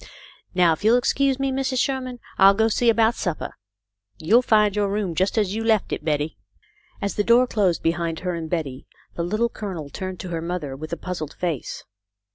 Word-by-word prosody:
Now, 175 -2 +5
if 160 - -7
you'll 225 +3 +5
excuse 270 +1 +1
me, 275 0 -1
Mrs. 265 0 -1
Sher 265 +1 +1
man, 250 -1 -7 0.2
I'll 195 0 +7
go 220 - +2
and 220 -1 +2
see 240 - +3
about 225 0 +4
supper. 175 -8 -3 0.6
You'll 220 +10 +4
find 210 -4 +3
your 205 -1 +1
room 200 -3 -1
just 190 +6 0
as 205 -3 +1
you 225 +1 -2
left 220 -3 +1
it, - - -4
Betty." 150 0 -1 0.6
As 200 - -1
the 205 - +2
door 235 +3 +5
closed 200 -8 0
behind 165 0 -1
her 180 -1 -2
and 165 -2 -5
Betty, 145 -6 -3 0.3
the - - -4
Little 215 +7 +1
Colonel 180 -11 -6
turned 185 -1 -5
to 185 - -7
her 165 -1 -3
mother 165 -5 -4
with 155 +3 -8
a 170 - -2
puzzled 175 -5 -5
face. 170 -7 -3
195 Hz, 210 wpm, -23 LUFS, 170-225 Hz, 0.6 s, I'll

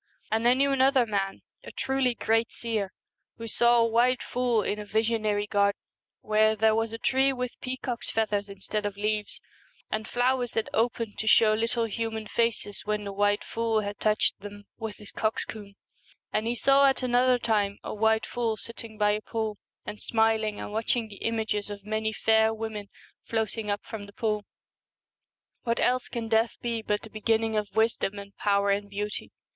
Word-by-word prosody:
And 225 +2 +2
I 245 - +6
knew 275 +1 +2
another 265 -1 +4
man, 195 -3 -2 0.2
a - - -9
truly 265 -2 0
great 225 +1 +1
seer, 215 -5 -2 0.5
who 230 - -6
saw 240 +2 +4
a 230 - +5
white 240 +3 +3
fool 245 -3 +1
in 210 - -2
a - - -4
visionary 215 -1 0
garden, 200 -1 +2 0.4
where 215 0 +3
there 220 +1 +4
was 225 0 0
a 225 - -4
tree 265 +3 +2
with 250 -2 -3
pea 255 0 -3
cocks' 245 -2 -3
feathers 210 -2 0
instead 205 +1 -3
of 200 -1 -6
leaves, 210 0 -2 0.5
and 215 0 -2
flowers 245 0 +1
that 225 - -1
opened 230 -1 0
to 220 - -3
show 220 -1 +6
little 230 +2 0
human 225 0 -3
faces 230 -2 -1
when 210 0 -1
the 200 -1 -5
white 205 +1 +2
fool 225 -1 0
had 205 0 -5
touched 215 0 +1
them 205 +1 -9 0.2
with 220 -2 -5
his 210 - -9
coxcomb, 215 -2 -3 0.6
and 215 +1 0
he 240 - 0
saw 275 +3 +5
at 270 -1 +1
191 250 - -1
The 245 - +5
another 250 -1 +5
time 210 -4 0
a - - -4
white 220 +1 +2
fool 230 -2 -1
sitting 230 -1 -7
by 210 0 +3
a 210 +1 -1
Twilight. 220 -1 -2
P°°l 210 - -15 0.3
an - - -5
d - - -15
smiling 220 -2 +1
and - - -6
watching 225 +1 0
the 200 - -11
images 220 -2 -1
of 200 -1 -8
many 220 0 -1
fair 220 0 +3
women 220 -2 -5 0.4
floating 220 -1 -2
up 205 0 -1
from 205 -2 -7
the 200 - -14
pool. 210 -2 -1 1.2
What 235 -1 -1
else 255 0 +2
can 230 -1 -4
death 225 +1 +2
be 235 -1 -2
but 210 -1 -1
the 220 - -10
begin 220 +1 +1
ning 225 -1 -1
of 210 -2 -2
wisdom 220 -2 +1
and 200 0 -9
power 200 -1 +2
and 200 0 -1
beauty 205 +1 -4
220 Hz, 195 wpm, -27 LUFS, 210-230 Hz, 1.2 s, I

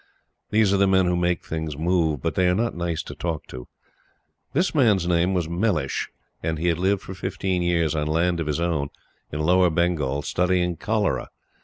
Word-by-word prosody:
These 105 -2 +3
are - - +3
the 100 0 +4
men 95 -1 +4
who 90 0 +1
make 90 0 0
things 80 -2 -4
move; 80 -4 +1
but - - 0
they 90 -1 +2
are 90 - +2
not 115 +3 0
nice 85 -2 -2
to - - -8
talk 85 -3 -4
to. 60 -1 -8 0.8
This 180 +6 +1
man's 105 - +3
name 90 +2 +2
was 85 -3 0
Mellish, 85 -5 -1 0.3
and 80 0 -2
he 85 +3 +1
had 85 0 0
lived 95 +1 +1
for 95 - -7
fifteen 95 -1 -2
years 85 -3 +1
on 75 -1 -1
land 85 +2 +1
of 80 - -2
his 75 +1 -1
own, 80 -5 0 0.4
in 75 - -3
Lower 90 +3 +4
Bengal, 80 -5 0
studying 90 0 +1
cholera. 105 +2 -1
85 Hz, 195 wpm, -24 LUFS, 80-95 Hz, 0.8 s, the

